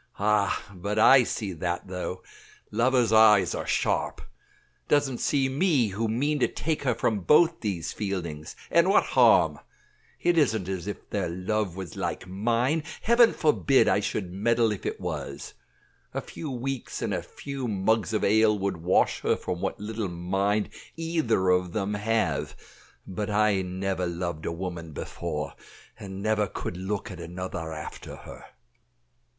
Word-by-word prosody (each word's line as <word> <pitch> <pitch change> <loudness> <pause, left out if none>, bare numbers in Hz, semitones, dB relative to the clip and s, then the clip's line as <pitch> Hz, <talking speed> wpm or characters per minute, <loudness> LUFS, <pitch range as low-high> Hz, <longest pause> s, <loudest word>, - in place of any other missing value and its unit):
Ah! 105 -1 +1
but 100 +3 -4
I 130 +4 +8
see 105 -4 -3
that, 85 +2 -3
though; 90 0 -5 0.5
lovers' 120 0 +2
eyes 110 -2 +6
are - - -4
sharp. - - 0 0.6
Doesn't 140 -4 +2
see 135 -2 +1
me, 135 - +2
who 105 +4 -2
mean 145 +7 0
to - - +3
take 160 -1 -2
her 125 -4 +1
from 110 -2 0
both 165 - +4
these 95 -7 -3
Fieldings 85 -7 -4 0.2
and - - +4
what - - +5
harm? - - +4 0.6
It 175 -1 +3
isn't 110 - +1
as 95 -1 -4
if 105 - -6
their 95 -4 -1
love 95 +1 -2
was 95 -2 -7
like - - -3
mine. 120 - 0 0.2
Heaven 235 0 +6
forbid 145 -3 +3
I - - +3
should 95 -2 -3
meddle 115 +3 +2
if 105 - -4
it - - -4
was. - - -5 0.6
A - - -1
few 155 - -7
weeks, 130 0 -4
and - - -1
a - - -1
few 140 -3 -6
mugs 110 +2 +1
of 110 - 0
ale 110 +1 +4
would 100 -2 -2
wash 85 +3 +2
her - - +2
from 90 -1 -4
what - - -2
little 105 -1 -3
mind 95 +4 0 0.3
either 160 - 0
of 90 -1 +2
them 105 -1 -1
have; 110 +2 -1 0.5
but 100 +2 -4
I 105 -2 +2
never 95 0 -2
loved 85 -2 -4
a - - -1
woman 85 -2 -6
before, 75 -2 -4 0.5
and 95 0 -7
never 110 -1 +1
could 90 - -5
look 100 +3 -4
at 90 - -9
another 85 -1 -5
after 75 -1 -7
her." - - -12
105 Hz, 155 wpm, -27 LUFS, 90-115 Hz, 0.6 s, I